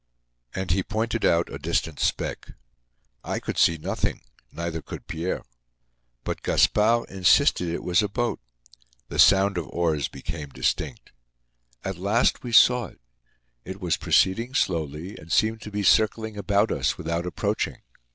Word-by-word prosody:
And 95 -2 -2
he 95 +3 +2
pointed 110 +3 -2
out 85 +1 +2
a - - -6
distant 80 -3 -2
speck. - - -2 0.7
I - - -3
could - - -4
see 85 - +4
nothing, 75 - -2 0.3
neither 85 -1 -4
could - - -9
Pierre. 85 +3 -3 0.8
But - - -4
Gaspard 115 +3 +3
insisted 95 - +3
it 85 - -4
was 90 +2 +3
a 105 - 0
boat. 120 +2 -2 0.7
The - - -5
sound 95 -1 +5
of 80 - -6
oars 80 -1 0
became 75 +1 -7
distinct. - - -3 0.7
At 95 -2 -4
last, 105 +6 +2
we 120 - -6
saw 120 0 +5
it. - - -19 0.6
It 95 +1 -8
was 90 -4 0
proceeding 115 +7 +1
slowly 80 +2 -2
and 80 +2 -12
seemed 110 +4 +2
to 105 - -8
be 105 0 -2
circling 110 +1 +2
about 100 0 +1
us - - 0
without 85 +2 -3
approaching. 90 - -2
95 Hz, 150 wpm, -25 LUFS, 85-110 Hz, 0.8 s, sound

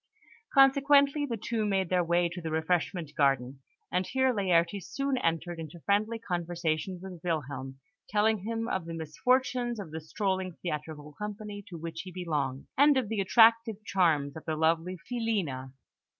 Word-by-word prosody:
Consequently, 280 +1 +5
the 235 -3 -3
two 220 +1 -2
made 195 -4 0
their 180 -1 +2
way 170 +1 +2
to 170 +1 -7
the 165 - -4
refreshment 160 0 -1
gardens; 135 -2 +1 0.3
and 180 0 0
here 260 -1 +2
Laertes 185 -2 +1
soon 275 -1 -1
entered 165 -1 -1
into 165 +2 -8
friendly 215 +5 +1
conversation 175 -3 -2
with 185 -2 -9
Wilhelm, 140 -5 -3 0.3
telling 215 +1 +2
him 225 +3 -3
of 185 -3 -2
the 165 - -5
misfortunes 240 - 0
of 185 -6 -7
the 160 +1 -5
strolling 190 +2 -2
theatrical 150 -2 -5
company 210 +2 -6
to 175 - -8
which 165 0 -6
he 185 - -9
belonged, 150 -7 -2
and 285 0 +5
of 245 -6 0
the 220 -2 -1
attractive 225 +1 +4
charms 155 -8 +2
of 160 - -8
the 160 -2 -1
lively 165 +3 +1
Filina. 200 - -2
180 Hz, 160 wpm, -29 LUFS, 160-220 Hz, 0.3 s, Consequently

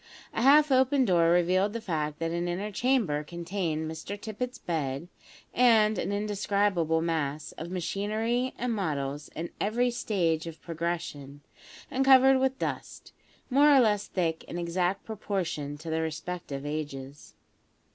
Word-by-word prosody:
A - - -1
half 290 +3 +6
open 260 +1 +4
door 170 -5 +4
revealed 180 +4 +3
the 230 - -3
fact 155 -7 -3
that 165 0 -2
an 170 +1 -1
inner 190 +5 -3
chamber 215 - +1
contained 170 -1 -3
Mr 160 +6 -6
Tippet's 235 +4 -5
bed, 150 -1 -3 0.4
and 220 -3 +4
an - - -2
indescribable 200 -5 0
mass 155 -3 -2
of 165 - -8
machinery 215 +7 -1
and 245 -1 -1
models 145 -7 -3
in 170 +2 -5
every 245 +4 +1
stage 170 -9 0
of 165 -1 -8
progression, 165 -4 -4 0.5
and 270 -1 +1
covered 265 0 +7
with 265 0 +1
dust, - - -5 0.4
more 290 +3 +6
or 275 - +7
less 210 -4 +2
thick 165 -3 -1
in - - -6
exact 175 +2 -1
proportion 185 -9 -3
to 160 +2 -7
their 160 0 0
respective 160 -3 -5
ages. 145 -2 -6
180 Hz, 145 wpm, -28 LUFS, 160-220 Hz, 0.5 s, covered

